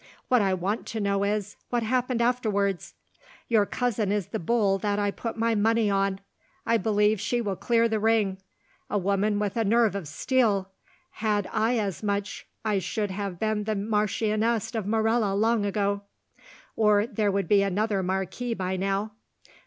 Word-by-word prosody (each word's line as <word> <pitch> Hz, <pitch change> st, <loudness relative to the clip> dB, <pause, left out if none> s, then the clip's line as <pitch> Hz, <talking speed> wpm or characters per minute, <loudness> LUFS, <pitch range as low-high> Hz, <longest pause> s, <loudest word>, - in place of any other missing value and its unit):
What 250 Hz, -2 st, +4 dB
I 190 Hz, -2 st, +2 dB
want 195 Hz, +5 st, -2 dB
to 225 Hz, -, -4 dB
know 200 Hz, -1 st, 0 dB
is, 205 Hz, 0 st, -2 dB
what 240 Hz, -1 st, 0 dB
happened 250 Hz, +1 st, 0 dB
afterwards? 205 Hz, -6 st, 0 dB, 0.5 s
Your 215 Hz, -4 st, +3 dB
cousin 225 Hz, -5 st, -1 dB
is 205 Hz, -4 st, -1 dB
the -, -, -3 dB
bull 195 Hz, +1 st, +1 dB
that 205 Hz, +1 st, -1 dB
I 205 Hz, -1 st, +1 dB
put 230 Hz, +3 st, -5 dB
my 230 Hz, 0 st, +1 dB
money 220 Hz, 0 st, +2 dB
on: 195 Hz, -1 st, 0 dB, 0.5 s
I 230 Hz, 0 st, +3 dB
believe 210 Hz, -2 st, +2 dB
she 240 Hz, +3 st, 0 dB
will 205 Hz, -5 st, -2 dB
clear 230 Hz, +3 st, +2 dB
the 220 Hz, -1 st, -1 dB
ring. 210 Hz, -3 st, +1 dB, 0.5 s
A 210 Hz, -, 0 dB
woman 200 Hz, +2 st, +1 dB
with 205 Hz, -2 st, -1 dB
a 230 Hz, -, +1 dB
nerve 225 Hz, -1 st, +3 dB
of 195 Hz, -6 st, -4 dB
steel; 200 Hz, -, +1 dB, 0.4 s
had 210 Hz, -3 st, -1 dB
I 225 Hz, +3 st, +2 dB
as 200 Hz, -5 st, -2 dB
much 205 Hz, -1 st, -3 dB, 0.2 s
I 210 Hz, -2 st, +2 dB
should 205 Hz, +3 st, -2 dB
have 195 Hz, -2 st, -4 dB
been 215 Hz, +1 st, -1 dB
the 215 Hz, 0 st, -1 dB
Marchioness 215 Hz, +2 st, 0 dB
of 220 Hz, -4 st, -3 dB
Morella 220 Hz, -1 st, +1 dB
long 220 Hz, 0 st, +2 dB
ago, 200 Hz, 0 st, 0 dB, 0.7 s
or 210 Hz, -1 st, +4 dB
there 215 Hz, -3 st, 0 dB
would 195 Hz, -2 st, -1 dB
be 200 Hz, +1 st, +5 dB
another 200 Hz, +1 st, 0 dB
marquis 190 Hz, +6 st, -2 dB
by 185 Hz, -1 st, -2 dB
now. 195 Hz, +3 st, -1 dB
210 Hz, 170 wpm, -26 LUFS, 200-225 Hz, 0.7 s, be